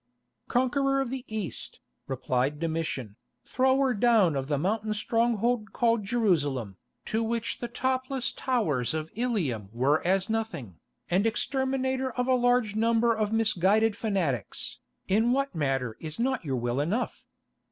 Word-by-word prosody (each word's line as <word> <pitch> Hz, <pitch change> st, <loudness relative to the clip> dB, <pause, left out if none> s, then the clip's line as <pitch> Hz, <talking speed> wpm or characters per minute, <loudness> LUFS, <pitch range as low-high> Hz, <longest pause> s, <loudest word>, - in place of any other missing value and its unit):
"Conqueror 275 Hz, +2 st, +2 dB
of 270 Hz, -3 st, -1 dB
the 265 Hz, -1 st, -4 dB
East," 215 Hz, -5 st, -5 dB, 0.3 s
replied 130 Hz, +2 st, -1 dB
Domitian, 160 Hz, -10 st, -3 dB, 0.3 s
"Thrower 265 Hz, 0 st, +2 dB
down 210 Hz, -7 st, +4 dB
of 135 Hz, -1 st, -2 dB
the 145 Hz, -1 st, 0 dB
mountain 215 Hz, +7 st, -1 dB
stronghold 230 Hz, 0 st, 0 dB
called 230 Hz, -3 st, +2 dB
Jerusalem, 145 Hz, -, 0 dB, 0.3 s
to 220 Hz, -, -1 dB
which 230 Hz, 0 st, -2 dB
the 240 Hz, -, -3 dB
topless 260 Hz, +1 st, -1 dB
towers 160 Hz, -, 0 dB
of 155 Hz, 0 st, -4 dB
Ilium 175 Hz, -, -1 dB
were 135 Hz, +7 st, +2 dB
as 190 Hz, +1 st, +2 dB
nothing, 220 Hz, -, -3 dB, 0.3 s
and 190 Hz, +5 st, +2 dB
Exterminator 265 Hz, +2 st, 0 dB
of 250 Hz, -, 0 dB
a 260 Hz, -, +4 dB
large 245 Hz, -3 st, +2 dB
number 230 Hz, +1 st, +3 dB
of 215 Hz, -1 st, -1 dB
misguided 220 Hz, 0 st, +3 dB
fanatics, 180 Hz, -, -2 dB, 0.3 s
in 225 Hz, +5 st, +3 dB
what 275 Hz, +1 st, 0 dB
matter 135 Hz, -7 st, -1 dB
is 155 Hz, -1 st, -7 dB
not 260 Hz, -1 st, 0 dB
your 135 Hz, -4 st, -2 dB
will 120 Hz, +2 st, -1 dB
enough? 200 Hz, +12 st, -2 dB
220 Hz, 140 wpm, -28 LUFS, 155-245 Hz, 0.3 s, down